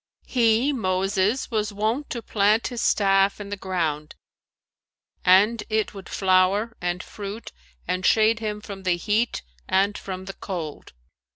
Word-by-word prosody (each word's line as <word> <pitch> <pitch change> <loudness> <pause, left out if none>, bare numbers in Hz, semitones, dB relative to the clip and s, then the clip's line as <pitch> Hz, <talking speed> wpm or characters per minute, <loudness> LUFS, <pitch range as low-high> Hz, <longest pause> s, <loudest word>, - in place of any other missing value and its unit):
'"[FN#441] - - -24
"He, 240 +3 +3
Moses, 195 +2 0
was 215 -2 0
wont 220 +8 -1
to 235 -2 -5
plant 210 +2 +2
his 240 -2 -4
staff 195 0 +3
in 205 -1 -7
the 205 - -3
ground, 165 -6 -3 1.1
and 205 +5 +5
it 215 -1 0
would 195 -2 -10
flower 195 +4 +2
and 175 +1 -2
fruit 205 +2 -8 0.4
and 185 +1 -1
shade 220 +2 +4
him 210 -1 -4
from 200 -2 -8
the 185 -2 +1
heat 215 +6 0 0.3
and 195 +2 +2
from 185 -1 -6
the 195 - -6
cold. 170 - -6
200 Hz, 150 wpm, -24 LUFS, 185-220 Hz, 1.1 s, and